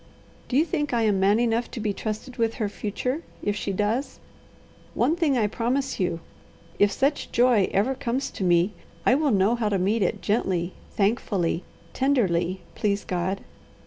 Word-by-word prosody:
Do 255 - 0
you 310 - +4
think 295 -7 -1
I 230 - +2
am 205 -3 +2
man 200 +3 +4
enough 235 0 +1
to - - -6
be 210 -2 -1
trusted 215 +5 -5
with 230 -1 +1
her 215 - -1
future, 220 +8 -3 0.2
if 205 - 0
she 205 - -2
does? 210 +7 -1 0.8
One 320 - +2
thing 315 -6 +2
I 220 - +3
promise 245 +6 -1
you: 175 -3 -1 0.6
if 205 0 +5
such 280 +6 0
joy 240 -5 +4
ever 210 +7 +2
comes 265 0 -2
to - - -5
me, 175 +3 +3 0.3
I - - +5
will 295 +2 +2
know 200 -1 +3
how 230 -3 0
to 200 - +1
meet 200 +5 +1
it 185 - +1
gently, 185 -5 0 0.2
thankfully, 195 -4 0 0.3
tenderly, 190 -10 +1
please 200 -1 -1
God. 185 +2 -2
215 Hz, 175 wpm, -25 LUFS, 195-250 Hz, 0.8 s, if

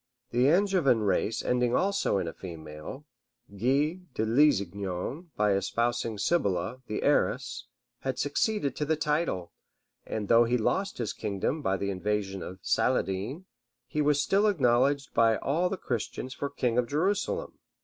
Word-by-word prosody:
The 125 +2 +3
Anjevan 175 - +3
race 105 +2 0
ending 125 -1 +2
also 200 - +1
in 90 - -1
a 80 - -4
female, 80 - -9 0.5
Guy 140 - +1 0.2
de 110 - 0
Lusignan, 110 - +1
by 105 -1 +3
espousing 115 +3 -1
Sibylla, 105 - 0
the 105 - -3
heiress, - - +1 0.3
had 130 -1 -3
succeeded 145 - 0
to 150 - -1
the 160 +2 +1
title; 150 - -1 0.5
and 105 -2 -4
though 115 +2 +6
he 120 +2 +2
lost 195 - 0
his 120 -3 -2
kingdom 105 +8 -2
by 95 -7 0
the 100 +1 -2
invasion 95 0 -2
of 90 +3 -7
Saladin, 105 - 0 0.4
he 150 - -2
was 145 -1 +3
still 200 +7 +3
acknowledged 135 - +2
by 115 -1 +4
all 170 +6 0
the 195 - -3
Christians 125 - -4
for 140 - -3
king 125 -4 0
of 120 - 0
Jerusalem. 200 - -1
125 Hz, 150 wpm, -28 LUFS, 100-150 Hz, 0.5 s, though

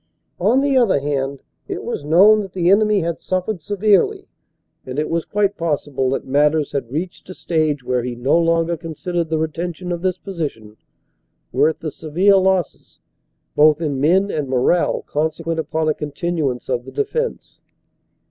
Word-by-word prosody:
On 225 +9 +3
the 280 -1 +1
other 230 - +3
hand, 140 -1 -3 0.2
it - - -5
was - - -4
known 190 +8 +6
that 195 -3 -6
the 180 -1 +2
enemy 210 0 +4
had 170 0 -3
suffered 185 0 -2
severely, 205 +2 +1 0.6
and 130 +1 -7
it 150 - -1
was 165 0 -1
quite 205 -1 0
possible 145 -5 -1
that 135 - -2
matters 150 +2 +2
had 135 -4 -3
reached 175 +5 -5
a 185 - -8
stage 155 -5 -1
where 125 0 0
he 120 0 -4
no 125 +5 +1
longer 165 0 +2
considered 165 +1 -4
the 160 - 0
retention 170 +3 -3
of 175 -1 -3
this 185 0 0
position 145 - -6 0.8
worth 150 +5 +2
the 155 - -4
severe 180 +7 +2
losses 190 -1 0 0.6
both 150 0 +5
in 145 -5 -2
men 190 +7 +3
and 145 -4 -3
morale 130 +7 +1
consequent 160 +2 -2
upon 160 0 -1
a 155 - +3
continuance 150 -3 -3
of 125 -1 -2
the 130 - -9
defense. 470 - -3
160 Hz, 165 wpm, -20 LUFS, 145-185 Hz, 0.8 s, known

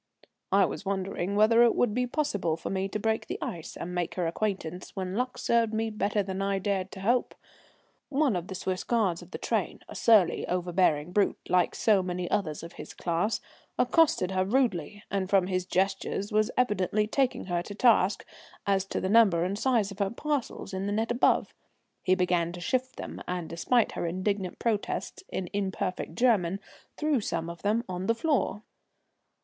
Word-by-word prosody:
I 195 0 +5
was - - -5
wondering 195 -1 -2
whether 220 +3 +5
it 240 -1 +5
would 230 -4 +2
be 250 +2 0
possible 205 - -1
for - - -5
me 190 0 -1
to 210 - -2
break 220 +1 -1
the - - -3
ice 165 -3 -6
and 180 - -5
make 175 -2 -2
her 180 - 0
acquaintance, 180 -1 -3
when 185 -1 -3
luck 250 +4 -2
served 230 -2 +1
me 225 0 -1
better 210 -1 0
than 190 0 -4
I 195 0 +1
dared 195 -1 -1
to 190 - -8
hope. 240 +5 +1 0.7
One 280 -5 +2
of 175 0 -3
the 190 - -6
Swiss 185 0 -2
guards 210 -8 +1
of - - -13
the - - -6
train, - - -2
a - - -9
surly, 210 -7 +4
overbearing 175 -3 +1
brute, 200 +2 +2
like 180 -1 +2
so 210 -4 +3
many 180 -1 -3
others 160 -6 -1
of 170 - -9
his - - -10
class, 175 +6 -1 0.4
accosted 305 - +3
her 185 0 +1
rudely, 205 - 0
and 190 -2 -1
from 195 -2 +4
his 185 -1 -2
gestures 195 +2 -1
was 215 +1 +2
evidently 210 -3 +2
taking 260 +4 0
her 175 -2 -1
to 205 +3 -8
task 210 -4 +3 0.4
as 195 -1 +2
to - - -3
the - - -1
number 195 -5 +5
and 195 +3 -2
size 230 -6 +2
of 200 - -10
her 200 -1 +1
parcels 275 -5 -3
in 190 +1 -2
the - - -1
net 225 +3 0
above. 240 - +2 0.5
He 185 - +3
began 180 -2 +1
to 175 - -7
shift 255 +7 -1
them, - - -7
and, 180 -2 -3
despite 220 +9 +1
her 170 - -3
indignant 185 +1 -2
protests 230 - -2
in 185 - -3
imperfect 190 -2 -2
German, 200 -7 +2 0.4
threw 300 -5 +1
some 165 -4 -2
of 170 - -11
them 215 +3 +1
on 185 +1 -4
the 230 - +3
floor. 230 -6 0
195 Hz, 190 wpm, -28 LUFS, 180-225 Hz, 0.7 s, I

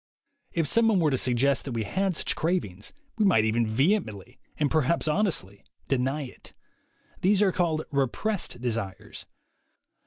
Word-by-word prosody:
If 165 -2 0
someone 225 +1 +3
were 155 -3 +2
to 130 - +1
suggest 130 +2 +1
that 135 - -4
we 115 -1 -1
had 190 - -1
such - - -1
cravings 155 - -2 0.3
we - - +4
might 170 - +4
even 115 +1 +1
vehemently, 115 - 0 0.2
and 150 -2 0
perhaps 160 +1 +1
honestly, 150 - -1 0.2
deny 135 +3 0
it. 125 - -11 0.7
These 200 +2 +4
are 195 - +3
called 165 -3 0
"repressed" 140 - -1
desires. 115 -6 -5
145 Hz, 145 wpm, -27 LUFS, 115-180 Hz, 0.7 s, we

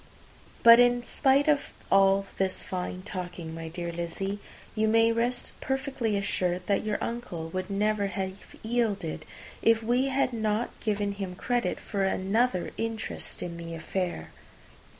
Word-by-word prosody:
But 235 0 +10
in 245 0 +4
spite 275 +3 +3
of 295 -2 +2 0.2
all 195 0 +5
this 190 -1 +1
fine 185 0 -4
talking, 175 -4 -5
my 165 0 -6
dear 170 +1 -4
Lizzy, 170 +4 -3 0.3
you 220 0 +1
may 225 +1 +5
rest 240 +2 0
perfectly 265 -5 -1
assured 180 -2 -1
that 200 +1 +1
your 215 -1 0
uncle 230 -9 -4
would 185 +1 -3
never 205 0 +1
have 190 -1 -3 0.3
yielded, 220 -8 -1 0.4
if 225 0 +4
we 245 +4 +2
had 270 -1 +1
not 220 0 0
given 205 -2 0
him 195 -2 -5
credit 245 +5 -1
for 200 -2 -2
another 195 +2 +1
interest 225 -1 -3
in 170 -1 -5
the 165 0 -6
affair. 175 - -3
205 Hz, 145 wpm, -28 LUFS, 185-235 Hz, 0.4 s, But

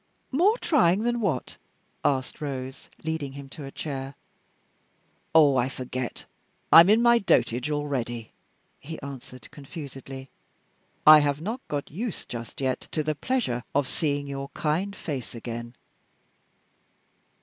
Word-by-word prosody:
"More 375 - +4
trying 215 - +3
than 240 0 0
what?" 160 - -1 0.5
asked 130 0 0
Rose, 135 -2 -5
leading 160 -4 -3
him 140 -1 -9
to 145 +1 -8
a 135 - -8
chair. 135 -2 -5 1.2
"Ah! 150 -3 +7
I 125 +1 +2
forget. 130 -1 -5 0.5
I - - +12
am 170 +3 +8
in 220 +3 +5
my 235 0 +6
dotage 125 - +2
already!" 130 -6 -2 0.5
he 160 +3 -7
answered, 130 -3 -9
confusedly. 135 -2 -9 0.7
"I 155 0 +11
have 145 -1 +1
not 220 +10 -4
got 145 -1 -3
used 210 - -4
just 120 +2 -6
yet 130 -1 -1
to 155 - +1
the 155 +1 0
pleasure 150 - -1
of 140 -2 +2
seeing 145 -1 -1
your 140 0 -5
kind 180 +7 0
face 135 -6 -5
again." 120 +1 -6
140 Hz, 135 wpm, -26 LUFS, 130-165 Hz, 1.2 s, I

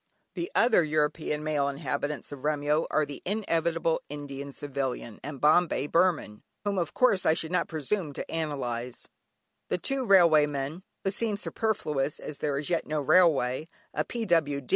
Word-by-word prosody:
The 350 +5 -4
other 225 -6 +5
European 150 0 0
male 150 -2 +1
inhabitants 145 +1 -3
of 145 - -7
Remyo, 150 +1 +1
are 155 - +2
the 145 -1 -8
inevitable 165 -5 0
Indian 140 -1 -6
Civilian 135 -5 -4
and 140 0 -6
"Bombay 155 -1 +3
Burman," 165 -10 +1 0.2
whom 200 -2 0
of 170 - -3
course 225 -8 +3
I 160 - +4
should 165 0 -3
not 180 - +1
presume 160 +2 -2
to - - -5
analyse; 125 -7 -4 0.8
two 270 -1 +1
railway 170 -8 +6
men 145 +4 -4 0.2
(who 195 - +1
seem 210 0 -1
superfluous 155 -11 -1
as 150 - -7
there 145 -2 -1
is 145 - -3
as - - -3
yet 170 - 0
no 155 0 -1
railway), 150 -2 +3 0.2
a - - 0
P.W.D. 160 - 0
155 Hz, 160 wpm, -28 LUFS, 140-175 Hz, 0.8 s, railway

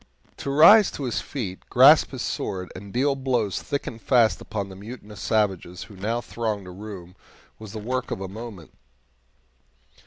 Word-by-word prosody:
To - - -5
rise 170 +9 +8
to 145 - -5
his 115 -7 -1
feet, 100 -9 -5
grasp 140 +5 +7
his 130 -3 -5
sword, 90 -2 -4
and 100 +1 -9
deal 135 +4 +1
blows 125 -7 -1
thick 140 - -3
and 115 - -7
fast 115 -4 +3
upon 100 -2 -4
the 95 - -10
mutinous 105 0 -10
savages 95 -5 -1
who 105 - -14
now 110 +5 -2
thronged 110 -3 -3
the 90 - -9
room 95 -2 -9 0.4
was 110 -2 -10
the - - -5
work 125 +4 -3
of - - -3
a 95 - -5
moment. 105 -4 -9
110 Hz, 175 wpm, -24 LUFS, 95-125 Hz, 0.4 s, rise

